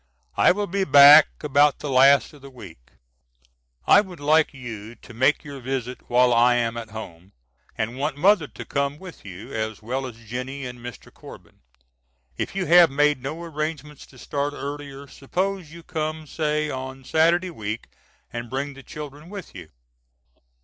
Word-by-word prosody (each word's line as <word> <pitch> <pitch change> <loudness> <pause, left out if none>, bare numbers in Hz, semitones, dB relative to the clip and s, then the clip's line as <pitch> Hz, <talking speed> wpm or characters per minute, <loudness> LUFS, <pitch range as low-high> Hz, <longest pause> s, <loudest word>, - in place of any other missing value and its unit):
I - - +5
will 205 +3 -1
be 195 +1 -1
back 145 -1 +9 0.2
about 145 0 +3
the 150 - -6
last 135 0 +5
of 145 - -16
the 140 - -11
week. 90 - -14 1.0
I 205 - +7
would 185 -4 -11
like 155 +2 +3
you 115 -4 -9
to 120 - -15
make 130 +6 +2
your 140 -2 -9
visit 130 -1 -5
while 125 0 +4
I 120 +1 +4
am 115 -1 -1
at 115 -1 -7
home, 95 -4 -10 0.4
and 115 +4 -3
want 145 0 -2
mother 185 -1 +3
to - - -10
come 140 0 -2
with 180 -1 -12
you, 95 0 -10
as 110 -1 -4
well 130 +4 -3
as 120 -3 -11
Jennie 130 +4 -5
and 125 -1 -8
Mr. 120 -2 -10
Corbin. - - -14 0.8
If - - -4
you 195 -2 -1
have 175 -1 +7
made 145 0 +2
no 155 +6 -6
arrangements 155 -2 -5
to 130 - -18
start 145 +3 -3
earlier 140 -1 -7
suppose 180 +5 -4
you 170 0 -12
come 155 -1 -4
say 150 0 -1
on 130 0 -7
Saturday 170 +6 +2
week 110 -6 -5 0.5
and 120 0 -6
bring 140 +3 -3
the 135 - -12
children 150 +2 -10
with 200 -3 -9
you. 90 -4 -11
140 Hz, 170 wpm, -23 LUFS, 120-155 Hz, 1.0 s, back